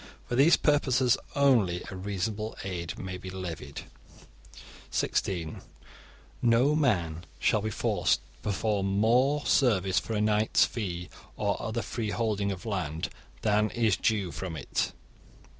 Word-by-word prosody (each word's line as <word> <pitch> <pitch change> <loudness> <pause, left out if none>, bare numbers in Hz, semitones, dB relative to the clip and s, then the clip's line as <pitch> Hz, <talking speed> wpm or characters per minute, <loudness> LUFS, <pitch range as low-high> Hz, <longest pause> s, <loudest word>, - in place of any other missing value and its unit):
For 120 - -2
these 140 +7 +6
purposes 130 -4 +3 0.2
only 115 -11 +3
a - - -6
reasonable 100 +3 -3
'aid' 90 -3 -4
may 95 -1 -5
be 95 - -7
levied. 90 -3 -6 1.1
(16) 85 -5 -1 0.8
No 120 +5 +4
man 90 - 0
shall 105 - +2
be 110 - -2
forced 105 - +1
to - - -26
perform 100 -1 0
more 130 +7 +3
service 100 -8 +3
for 110 - -5
a - - +1
knight's 105 +1 +3
'fee', 90 -7 -4 0.3
or - - 0
other 115 +1 -2
free 110 -3 -3
holding 105 -3 0
of 95 +1 -7
land, 85 -7 -2 0.3
than 105 0 +3
is 115 -5 +2
due 100 -2 0
from 80 +1 -5
it. 70 - -1
105 Hz, 135 wpm, -29 LUFS, 95-115 Hz, 1.1 s, these